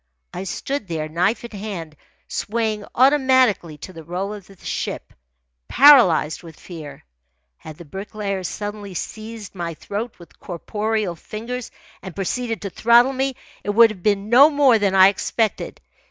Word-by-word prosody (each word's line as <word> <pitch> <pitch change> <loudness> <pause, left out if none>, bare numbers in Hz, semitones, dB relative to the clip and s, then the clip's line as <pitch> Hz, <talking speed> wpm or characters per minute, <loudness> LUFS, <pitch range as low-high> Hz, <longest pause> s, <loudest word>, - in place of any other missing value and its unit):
I 185 - -5
stood 270 +5 -4
there, 160 -3 -3
knife 180 +9 0
in 235 - -9
hand, 195 -7 -7 0.3
swaying 215 -1 -2
automatically 260 - +3
to 185 +5 -10
the 165 -1 -10
roll 185 +5 -4
of 205 -3 -10
the 195 - -17
ship, - - -4 0.5
paralysed 240 - +6
with 165 -3 -13
fear. 150 -6 -10 0.5
Had 155 -1 -11
the 170 - -11
Bricklayer 195 +2 -5
suddenly 205 0 -6
seized 220 +2 -7
my 170 -3 -5
throat 215 +8 -5
with 170 - -17
corporeal 210 +1 -3
fingers 230 +8 -6 0.3
and 190 -3 -9
proceeded 225 +4 -3
to 200 - -4
throttle 235 +7 +4
me, 265 0 -1 0.3
it - - -5
would 225 +2 +6
have 190 -4 -11
been 205 +1 0
no 260 +6 +7
more 280 -6 +4
than 200 -2 +1
I 190 0 +8
expected. 215 +2 -2
205 Hz, 155 wpm, -21 LUFS, 180-235 Hz, 0.5 s, I